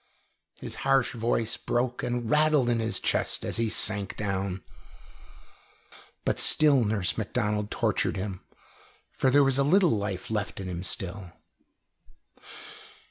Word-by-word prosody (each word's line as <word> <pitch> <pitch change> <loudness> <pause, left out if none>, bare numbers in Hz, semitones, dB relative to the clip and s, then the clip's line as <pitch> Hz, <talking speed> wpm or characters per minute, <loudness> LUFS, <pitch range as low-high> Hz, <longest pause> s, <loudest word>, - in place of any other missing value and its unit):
His - - -7
harsh 135 -2 +2
voice 115 -1 -1
broke 125 +1 -2
and 120 -1 -3
rattled 150 -2 +3
in 115 - +1
his 110 0 -1
chest - - -1
as - - -1
he 115 -1 0
sank 100 -2 +1
down. 95 -2 -3 1.6
But - - 0
still 145 -5 +4
Nurse 105 -2 0
Macdonald 105 -1 -2
tortured - - 0
him, 95 -1 -5 0.7
for 130 - +1
there 140 +2 +5
was 135 0 +2
a - - +4
little 175 +4 +4
life 100 -2 -3
left 105 -3 -3
in 95 - -5
him 90 -1 -5
still. 95 -1 -3
110 Hz, 135 wpm, -27 LUFS, 100-130 Hz, 1.6 s, there